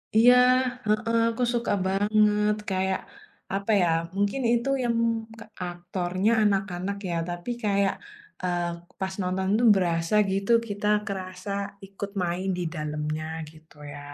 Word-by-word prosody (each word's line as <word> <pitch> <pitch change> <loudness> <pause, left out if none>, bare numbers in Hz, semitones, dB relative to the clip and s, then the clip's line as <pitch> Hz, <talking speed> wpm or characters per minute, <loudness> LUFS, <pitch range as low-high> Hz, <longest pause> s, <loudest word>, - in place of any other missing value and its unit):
Iya, 235 +3 +8 0.7
heeh, 230 0 +2
aku 230 +2 -2
suka 235 0 0 0.2
banget 210 +1 +3
kayak, 190 0 0 0.5
apa 200 +3 -1
ya, 175 - +3 0.3
mungkin 205 +7 0
itu 235 +2 +1
yang 235 -1 +1 0.4
ke - - -10 0.2
aktornya 180 +3 -1
anak-anak 195 -1 0
ya 170 - -1
tapi 175 +4 -5
kayak, 200 -1 +2 0.5
eee, 175 -1 0 0.3
pas 190 -1 -2
nonton 185 +1 -1
itu 225 +3 +2
berasa 170 0 +1 0.2
gitu 195 +3 0 0.2
kita 205 0 -4 0.2
kerasa 185 0 -5 0.3
ikut 195 +1 -7
main 180 +2 -2
di 180 - -2
dalamnya 150 0 -3 0.3
gitu 160 0 -20 0.2
ya. 145 - -8
190 Hz, 130 wpm, -26 LUFS, 175-210 Hz, 0.7 s, Iya